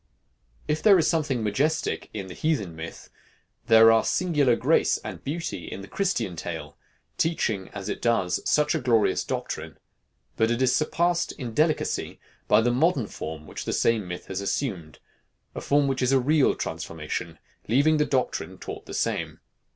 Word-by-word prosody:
If 150 Hz, +1 st, 0 dB
there 200 Hz, -3 st, +7 dB
is 165 Hz, -, +2 dB
something 145 Hz, -8 st, 0 dB
majestic 145 Hz, +10 st, -1 dB
in 100 Hz, -3 st, -5 dB
the 95 Hz, -, -9 dB
heathen 105 Hz, -, -1 dB
myth, 80 Hz, +1 st, -9 dB, 0.6 s
there 115 Hz, 0 st, +8 dB
are 115 Hz, 0 st, +4 dB
singular 150 Hz, -9 st, +2 dB
grace -, -, +2 dB
and -, -, -7 dB
beauty 145 Hz, -, -4 dB
in 100 Hz, -, -6 dB
the 100 Hz, -, -10 dB
Christian 125 Hz, -, -1 dB
tale, -, -, -6 dB, 0.4 s
teaching, 110 Hz, -, 0 dB
as 100 Hz, -1 st, -7 dB
it -, -, -4 dB
does, 115 Hz, -7 st, +1 dB
such 150 Hz, +1 st, +3 dB
a 160 Hz, -, 0 dB
glorious 120 Hz, -5 st, +2 dB
doctrine; -, -, -5 dB, 0.6 s
but 110 Hz, -, +3 dB
it 120 Hz, +1 st, 0 dB
is 130 Hz, -1 st, +3 dB
surpassed 170 Hz, +2 st, +1 dB
in 120 Hz, -4 st, -6 dB
delicacy 155 Hz, +5 st, 0 dB, 0.3 s
by -, -, +5 dB
the 120 Hz, +2 st, +2 dB
modern 135 Hz, -1 st, +2 dB
form 80 Hz, -5 st, -7 dB
which -, -, -7 dB
the -, -, -2 dB
same 110 Hz, -5 st, +1 dB
myth 90 Hz, 0 st, -6 dB
has 95 Hz, 0 st, -4 dB
assumed 95 Hz, -, -3 dB, 0.6 s
a -, -, -6 dB
form 145 Hz, 0 st, +2 dB
which 135 Hz, -1 st, -1 dB
is 125 Hz, 0 st, +2 dB
a 135 Hz, -, +5 dB
real 145 Hz, +2 st, +3 dB
transformation, 80 Hz, +1 st, -5 dB, 0.3 s
leaving 145 Hz, +7 st, +3 dB
the 150 Hz, -, +2 dB
doctrine 130 Hz, -2 st, -1 dB
taught -, -, -8 dB
the -, -, -6 dB
same. -, -, -2 dB
125 Hz, 170 wpm, -26 LUFS, 100-150 Hz, 0.6 s, there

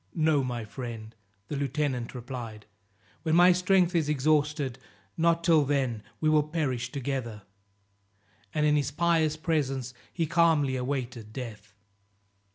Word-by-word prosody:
"No, 155 Hz, -4 st, +3 dB
my 120 Hz, -3 st, -3 dB
friend," 115 Hz, -2 st, -7 dB, 0.3 s
the -, -, -4 dB
lieutenant 140 Hz, -3 st, -2 dB
replied, 120 Hz, -4 st, -7 dB, 0.6 s
"when 160 Hz, -1 st, +1 dB
my 175 Hz, +1 st, +7 dB
strength 185 Hz, 0 st, +3 dB
is 160 Hz, -4 st, +1 dB
exhausted, 150 Hz, -2 st, +1 dB, 0.4 s
not 170 Hz, 0 st, +2 dB
till 160 Hz, -3 st, +5 dB
then, 135 Hz, -6 st, 0 dB, 0.2 s
we 155 Hz, -, 0 dB
will 155 Hz, -1 st, +5 dB
perish 145 Hz, -6 st, -2 dB
together;" 130 Hz, -6 st, -4 dB, 1.1 s
and 150 Hz, -1 st, +1 dB
in 150 Hz, 0 st, +4 dB
his 145 Hz, -2 st, +1 dB
pious 160 Hz, 0 st, +1 dB
presence 135 Hz, -7 st, -1 dB, 0.2 s
he 165 Hz, -, -1 dB
calmly 160 Hz, -5 st, +3 dB
awaited 125 Hz, -4 st, -4 dB
death. 110 Hz, -5 st, -8 dB
145 Hz, 130 wpm, -28 LUFS, 125-160 Hz, 1.1 s, my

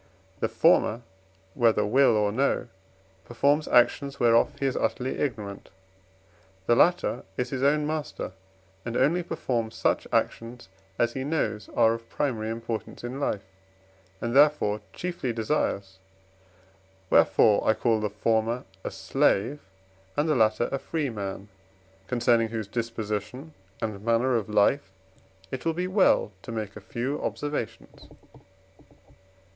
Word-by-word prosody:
The -, -, 0 dB
former, 115 Hz, +3 st, +3 dB, 0.5 s
whether 115 Hz, -3 st, +3 dB
will 120 Hz, +1 st, +4 dB
or 105 Hz, -1 st, +2 dB
no, 130 Hz, +1 st, 0 dB, 0.5 s
performs 140 Hz, +7 st, +1 dB
actions 140 Hz, +3 st, +3 dB
whereof 115 Hz, -1 st, +4 dB
he 140 Hz, -, -1 dB
is 135 Hz, -, 0 dB
utterly 130 Hz, +1 st, -1 dB
ignorant; 105 Hz, -8 st, -4 dB, 1.0 s
the 120 Hz, -, +4 dB
latter 175 Hz, +7 st, +2 dB
is 125 Hz, 0 st, -2 dB
his 130 Hz, -2 st, -3 dB
own 150 Hz, +2 st, +3 dB
master 155 Hz, 0 st, -4 dB, 0.5 s
and 120 Hz, 0 st, -3 dB
only 170 Hz, +5 st, +3 dB
performs 120 Hz, -9 st, -3 dB
such -, -, 0 dB
actions, 115 Hz, -3 st, -2 dB, 0.3 s
as 120 Hz, 0 st, +1 dB
he 130 Hz, -, -3 dB
knows 110 Hz, -9 st, -2 dB
are 115 Hz, -1 st, +5 dB
of 115 Hz, 0 st, -8 dB
primary 115 Hz, -7 st, -2 dB
importance 115 Hz, 0 st, -5 dB
in 125 Hz, +3 st, -5 dB
life, 105 Hz, -8 st, -1 dB, 0.8 s
and 120 Hz, +1 st, -3 dB
therefore 140 Hz, -8 st, +4 dB
chiefly 175 Hz, -8 st, -3 dB
desires; 105 Hz, -5 st, -2 dB, 1.1 s
wherefore 105 Hz, -2 st, +5 dB
I 110 Hz, -, +3 dB
call 115 Hz, -2 st, +1 dB
the 105 Hz, -1 st, -1 dB
former 115 Hz, +3 st, 0 dB, 0.2 s
a -, -, -3 dB
slave, 120 Hz, +9 st, +1 dB, 0.6 s
and 145 Hz, +2 st, +2 dB
the 155 Hz, -, +3 dB
latter 110 Hz, -1 st, +2 dB
a 135 Hz, -, -1 dB
free 150 Hz, -2 st, -2 dB
man, 100 Hz, -2 st, -5 dB, 0.6 s
concerning 120 Hz, -2 st, +2 dB
whose 110 Hz, -2 st, -4 dB
disposition 115 Hz, +5 st, -4 dB, 0.3 s
and 105 Hz, -3 st, -4 dB
manner 115 Hz, +3 st, +2 dB
of 110 Hz, -3 st, -1 dB
life 105 Hz, +1 st, +2 dB, 0.6 s
it 130 Hz, -, -5 dB
will 165 Hz, -, +1 dB
be 180 Hz, +1 st, -1 dB
well 185 Hz, -, +3 dB
to -, -, -8 dB
make 110 Hz, -3 st, -4 dB
a 105 Hz, -, -9 dB
few 120 Hz, +9 st, -3 dB
observations. 145 Hz, -6 st, -5 dB
120 Hz, 135 wpm, -26 LUFS, 110-140 Hz, 1.1 s, are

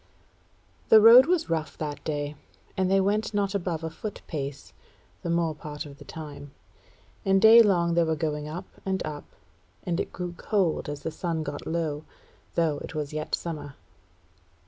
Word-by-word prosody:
The 220 Hz, -, +9 dB
road 235 Hz, +5 st, +9 dB
was 345 Hz, -2 st, +1 dB
rough 155 Hz, -3 st, -2 dB
that 150 Hz, -2 st, -5 dB
day, 145 Hz, -1 st, -3 dB, 0.4 s
and 185 Hz, -1 st, +1 dB
they 195 Hz, 0 st, +4 dB
went 205 Hz, +2 st, 0 dB
not 200 Hz, -1 st, 0 dB
above 175 Hz, -4 st, -2 dB
a 160 Hz, -, -3 dB
foot 205 Hz, +5 st, -7 dB
pace 140 Hz, -3 st, -6 dB, 0.5 s
the 170 Hz, -, -4 dB
more 170 Hz, -1 st, +1 dB
part 150 Hz, 0 st, -7 dB
of 140 Hz, -1 st, -12 dB
the -, -, -12 dB
time; 145 Hz, -3 st, -9 dB, 0.7 s
and 195 Hz, 0 st, +3 dB
daylong 205 Hz, -6 st, +6 dB
they 170 Hz, 0 st, +4 dB
were 160 Hz, -1 st, 0 dB
going 150 Hz, -1 st, -2 dB
up 175 Hz, +5 st, -6 dB, 0.2 s
and 190 Hz, -1 st, -2 dB
up, 150 Hz, -1 st, -6 dB, 0.6 s
and 175 Hz, 0 st, -1 dB
it -, -, -3 dB
grew 180 Hz, -1 st, -5 dB
cold 185 Hz, -9 st, 0 dB
as 145 Hz, -1 st, -6 dB
the 160 Hz, -, -3 dB
sun 165 Hz, -1 st, -3 dB
got 145 Hz, -2 st, -6 dB
low; 160 Hz, -3 st, -2 dB, 0.5 s
though 160 Hz, -4 st, +1 dB
it -, -, -8 dB
was 150 Hz, -1 st, -3 dB
yet 155 Hz, 0 st, -1 dB
summer. 150 Hz, -4 st, -6 dB
165 Hz, 170 wpm, -27 LUFS, 150-190 Hz, 0.7 s, The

